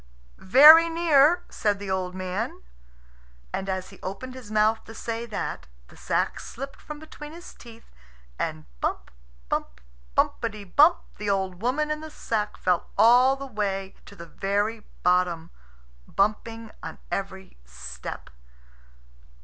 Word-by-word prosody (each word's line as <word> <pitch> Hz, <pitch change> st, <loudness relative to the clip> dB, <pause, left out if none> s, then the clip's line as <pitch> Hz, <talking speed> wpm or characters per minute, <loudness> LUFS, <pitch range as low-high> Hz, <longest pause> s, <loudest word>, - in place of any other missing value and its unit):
"Very 310 Hz, -, +9 dB
near," 330 Hz, 0 st, +4 dB
said 205 Hz, -1 st, 0 dB
the 200 Hz, -1 st, -5 dB
old 185 Hz, -1 st, -2 dB
man. 185 Hz, -, -4 dB, 0.9 s
And 195 Hz, +1 st, -3 dB
as 185 Hz, -1 st, -3 dB
he -, -, -15 dB
opened 200 Hz, +7 st, -6 dB
his 255 Hz, -5 st, -10 dB
mouth 215 Hz, +1 st, +2 dB
to 225 Hz, -, -11 dB
say 230 Hz, +1 st, -4 dB
that 215 Hz, -, -4 dB, 0.2 s
the -, -, -16 dB
sack -, -, -1 dB
slipped 275 Hz, +3 st, -8 dB
from 300 Hz, -, -8 dB
between 300 Hz, 0 st, -10 dB
his 345 Hz, +1 st, -11 dB
teeth, 230 Hz, -1 st, -15 dB, 0.5 s
and 80 Hz, -1 st, -3 dB, 0.2 s
bump, -, -, -2 dB, 0.4 s
bump, -, -, -3 dB, 0.4 s
bumpety 215 Hz, -3 st, 0 dB
bump, 295 Hz, -, +5 dB, 0.2 s
the 210 Hz, -1 st, -2 dB
old 190 Hz, -2 st, -1 dB
woman 295 Hz, +6 st, 0 dB
in 305 Hz, 0 st, -2 dB
the 315 Hz, -, -8 dB
sack 215 Hz, -7 st, -3 dB
fell 180 Hz, -2 st, 0 dB
all 250 Hz, +3 st, +6 dB
the 275 Hz, 0 st, -7 dB
way 195 Hz, -5 st, -3 dB
to 200 Hz, -, -12 dB
the 170 Hz, -, -9 dB
very 205 Hz, +5 st, -1 dB, 0.2 s
bottom, 180 Hz, -2 st, +2 dB, 0.6 s
bumping 220 Hz, +2 st, -1 dB
on -, -, -7 dB
every 190 Hz, -, -5 dB
step. -, -, -8 dB
215 Hz, 140 wpm, -26 LUFS, 190-260 Hz, 0.9 s, Very